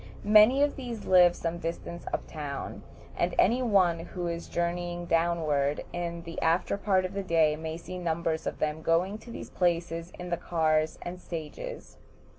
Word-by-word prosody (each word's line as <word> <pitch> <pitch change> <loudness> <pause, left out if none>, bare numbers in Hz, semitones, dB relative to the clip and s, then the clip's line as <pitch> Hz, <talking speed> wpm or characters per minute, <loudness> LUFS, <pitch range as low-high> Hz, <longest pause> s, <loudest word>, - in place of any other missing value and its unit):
Many 215 +6 +7
of 290 - 0
these 240 -5 -6
live 180 -2 +6
some 170 0 -3
distance 170 +1 -5
up - - -2
town, 145 -3 -6 0.3
and - - 0
any 240 +6 +4
one 190 -8 +3
who 175 +1 -5
is 170 0 -3
journeying 175 0 -2
downward 160 -4 +1
in 170 -1 -4
the 165 0 -6
after 165 +4 +2
part 195 -2 +1
of 185 - -5
the 200 - -2
day 165 -4 +3
may 160 +1 -5
see 180 +2 -7
numbers 165 -2 -1
of - - -3
them 155 +1 -1
going 180 +6 +1
to 235 - -14
these - - -8
places 170 -1 0
in 180 0 -7
the 170 - +1
cars 155 -2 +1
and 180 +1 -6
stages. 175 - -7
170 Hz, 175 wpm, -29 LUFS, 165-185 Hz, 0.3 s, Many